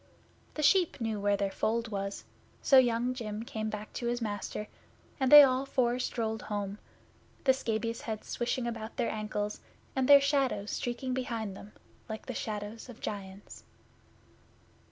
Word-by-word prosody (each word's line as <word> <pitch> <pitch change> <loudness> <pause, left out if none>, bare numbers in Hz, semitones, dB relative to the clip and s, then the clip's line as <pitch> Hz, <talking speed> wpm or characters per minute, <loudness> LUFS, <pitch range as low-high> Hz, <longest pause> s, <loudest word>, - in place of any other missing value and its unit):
The 305 - -2
sheep 350 +1 +4
knew 225 -3 -2
where 200 0 +2
their 200 -1 -1
fold 230 +2 -1
was, 195 -1 -4 0.4
so 270 - +7
Young 245 0 +2
Jim 220 -3 -5
came 220 -2 -3
back 210 0 -6
to 240 - -3
his 240 0 0
master, 210 -1 -4 0.5
and 265 -1 +1
they 295 0 +13
all 260 -1 +3
four 250 -2 +1
strolled 220 -3 -2
home, 205 -1 -4 0.6
the 265 - +5
scabious 230 -2 -2
heads 220 -2 -5
swishing 240 +1 -2
about 230 -1 -5
their 240 -3 0
ankles, 210 -1 -3 0.3
and 265 0 +1
their 285 0 +10
shadows 275 -7 0
streaking 250 +2 -3
behind 230 -6 -3
them 205 +2 -12 0.4
like 220 0 -6
the 255 - -5
shadows 215 +2 -5
of 240 - -11
giants. 195 -1 -7
230 Hz, 155 wpm, -30 LUFS, 210-255 Hz, 0.6 s, they